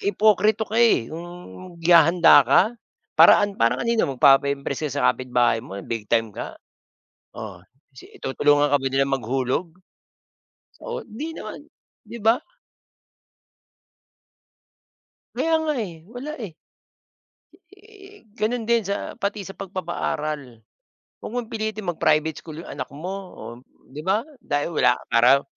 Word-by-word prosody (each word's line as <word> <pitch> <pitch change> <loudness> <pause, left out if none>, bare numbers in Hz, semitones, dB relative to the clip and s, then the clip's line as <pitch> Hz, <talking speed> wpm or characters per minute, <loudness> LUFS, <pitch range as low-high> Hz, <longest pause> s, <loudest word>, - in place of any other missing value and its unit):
ipoktrito 215 +2 +2
ka, 220 +2 -2
eh, 225 - +3
'yong 175 +2 -10
gihahanda 170 -2 +7
ka - - +6 0.6
para - - +8
an 205 - -4
parang 115 - +2
kanino? 230 -1 +2
Magpapa-impress 140 +2 +3
ka - - -9
sa - - 0
kapitbahay 125 -2 +1
mo 110 -4 -10
na 100 - -7
big-time 115 0 -1
ka? - - -7 0.8
Oh, 110 -6 -8 0.3
si 130 - -14
i - - -17
tutulungan 145 +2 +2
ka 145 - +5
ba 135 - -1
nila 135 +1 +2
maghulog? 135 +5 -1 1.1
So, 480 - -5
hindi 280 +8 -7
naman, - - -8 0.4
'di 230 +2 -9
ba? 225 +3 +4 3.0
Kaya 325 - 0
nga, 310 -1 0
eh. 175 -8 -6
Wala, 265 +6 -6
eh. 200 -6 -6 1.2
Eh, 400 - -17
gano'n 230 0 -2
din 235 0 +3
sa 200 0 -4
pati 200 -1 -4
sa 195 - -9
pagpapaaral. 155 - -4 0.6
Wag - - -8
mong 240 -2 -4
pilitin 215 -2 -4
mag-private 155 -1 +1
school 160 0 -9
'yong - - -11
anak - - -5
mo, 175 +6 -5 0.2
oh, 120 - -9 0.4
'di 140 +3 -8
ba? 200 +4 +2 0.2
Dahil 145 +3 -2
wala 125 -6 +3 0.2
para 125 +4 +5
170 Hz, 135 wpm, -23 LUFS, 135-220 Hz, 3.0 s, para